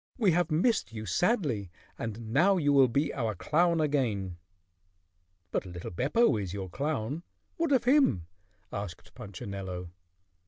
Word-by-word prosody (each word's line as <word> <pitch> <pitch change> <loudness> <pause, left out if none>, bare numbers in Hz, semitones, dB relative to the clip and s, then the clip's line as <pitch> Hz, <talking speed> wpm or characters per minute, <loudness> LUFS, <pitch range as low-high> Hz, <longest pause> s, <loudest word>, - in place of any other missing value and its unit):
We 215 -7 +4
have 175 0 +2
missed 180 - +2
you 110 -1 -6
sadly 140 - +1 0.3
and 115 0 -5
now 185 +8 +5
you 145 -4 +2
will 135 -2 +7
be 140 +6 0
our 115 -5 -1
clown 170 - +2
again." 115 - 0 1.1
"But - - 0
little 90 -2 -7
Beppo 140 - +2
is 95 -3 -4
your 95 -2 -5
clown. 140 - -2 0.4
What 335 -3 0
of 260 -4 +4
him?" 245 - +4 0.5
asked 100 -4 -6
Punchinello. 95 -2 -6
130 Hz, 135 wpm, -29 LUFS, -, 1.1 s, will